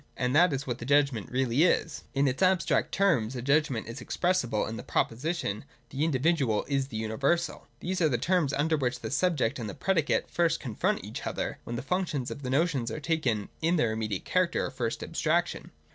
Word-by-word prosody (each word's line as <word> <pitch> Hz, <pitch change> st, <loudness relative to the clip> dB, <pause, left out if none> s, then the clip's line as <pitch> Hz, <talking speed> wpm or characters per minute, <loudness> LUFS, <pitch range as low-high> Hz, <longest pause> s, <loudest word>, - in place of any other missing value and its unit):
And 125 Hz, +2 st, 0 dB
that 175 Hz, +2 st, +6 dB
is 135 Hz, 0 st, -2 dB
what 125 Hz, -, -3 dB
the -, -, -6 dB
Judgment 140 Hz, -5 st, +2 dB
really 130 Hz, +1 st, +1 dB
is. 165 Hz, -2 st, +2 dB
' -, -, -35 dB
In 140 Hz, +1 st, +3 dB
its 130 Hz, +5 st, -1 dB
abstract 185 Hz, -1 st, +2 dB
terms 140 Hz, -, +2 dB
a 125 Hz, -, -3 dB
Judgment 140 Hz, -5 st, +1 dB
is 115 Hz, +3 st, -7 dB
expressible 125 Hz, -, 0 dB
in 110 Hz, -, -5 dB
the -, -, -5 dB
proposition: 120 Hz, -, -1 dB
' 120 Hz, 0 st, -36 dB
The 140 Hz, +2 st, -1 dB
individual 140 Hz, -6 st, +1 dB
is 135 Hz, -2 st, 0 dB
the 120 Hz, -5 st, -6 dB
universal.' 140 Hz, +11 st, -1 dB
These 185 Hz, +1 st, -2 dB
are 160 Hz, -, +4 dB
the 125 Hz, -, +1 dB
terms 175 Hz, -4 st, +1 dB
under 155 Hz, +3 st, +1 dB
which 125 Hz, -3 st, -1 dB
the 110 Hz, -, -5 dB
subject 145 Hz, -6 st, +1 dB
and 110 Hz, -3 st, -4 dB
the 100 Hz, -, -7 dB
predi 170 Hz, -6 st, +1 dB
cate -, -, +1 dB
first 165 Hz, -1 st, +1 dB
confront 120 Hz, -6 st, -1 dB
each -, -, -6 dB
other, -, -, -3 dB
when 120 Hz, -, -4 dB
the 120 Hz, -, -4 dB
functions 160 Hz, -5 st, -1 dB
of -, -, -6 dB
the 130 Hz, -, -4 dB
notion 145 Hz, -1 st, +1 dB
are 115 Hz, -, -4 dB
taken 140 Hz, -10 st, -1 dB
in 165 Hz, +2 st, +2 dB
their 120 Hz, -9 st, +2 dB
immediate 110 Hz, -4 st, -3 dB
character -, -, +1 dB
or -, -, -4 dB
first -, -, -3 dB
abstraction. -, -, -1 dB
140 Hz, 215 wpm, -28 LUFS, 120-165 Hz, -, that